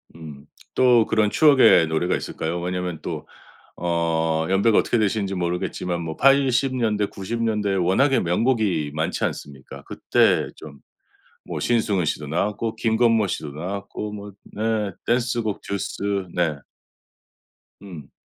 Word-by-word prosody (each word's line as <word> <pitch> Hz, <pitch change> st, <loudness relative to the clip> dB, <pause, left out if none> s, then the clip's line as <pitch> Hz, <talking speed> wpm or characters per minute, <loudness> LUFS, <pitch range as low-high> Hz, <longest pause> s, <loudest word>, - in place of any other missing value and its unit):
음 75 Hz, -3 st, -11 dB, 0.3 s
또 125 Hz, -3 st, +4 dB
그런 110 Hz, -2 st, +2 dB
추억의 130 Hz, -, +6 dB
노래가 80 Hz, +3 st, 0 dB
있을까요? 85 Hz, +2 st, -4 dB
왜냐하면 90 Hz, -2 st, -3 dB
또 -, -, -6 dB, 0.5 s
어 80 Hz, -2 st, 0 dB
연배가 100 Hz, +3 st, +3 dB
어떻게 -, -, +2 dB
되시는지 100 Hz, -2 st, 0 dB
모르겠지만 90 Hz, -1 st, -2 dB
뭐 80 Hz, -1 st, -5 dB
80 135 Hz, -1 st, +3 dB
년대, 105 Hz, -4 st, 0 dB
90 115 Hz, +5 st, -5 dB
년대 105 Hz, -3 st, 0 dB
워낙에 95 Hz, +10 st, +2 dB
명곡이 90 Hz, -, 0 dB
많지 80 Hz, +1 st, -2 dB
않습니까? 70 Hz, -2 st, -7 dB
그때 -, -, +2 dB
좀 70 Hz, -3 st, -12 dB, 0.7 s
뭐 -, -, -5 dB
신승훈 105 Hz, -7 st, +1 dB
씨도 75 Hz, -1 st, -3 dB
나왔고 105 Hz, +7 st, -2 dB
김건모 115 Hz, -1 st, +2 dB
씨도 75 Hz, -4 st, -4 dB
나왔고 100 Hz, +6 st, -6 dB
뭐 105 Hz, 0 st, -8 dB, 0.2 s
네 105 Hz, -2 st, -1 dB
댄스곡 120 Hz, -3 st, 0 dB
듀스 100 Hz, -1 st, -3 dB
네. 85 Hz, -4 st, +1 dB, 1.3 s
음. 90 Hz, -7 st, -10 dB
100 Hz, 265 characters per minute, -23 LUFS, 85-110 Hz, 1.3 s, 추억의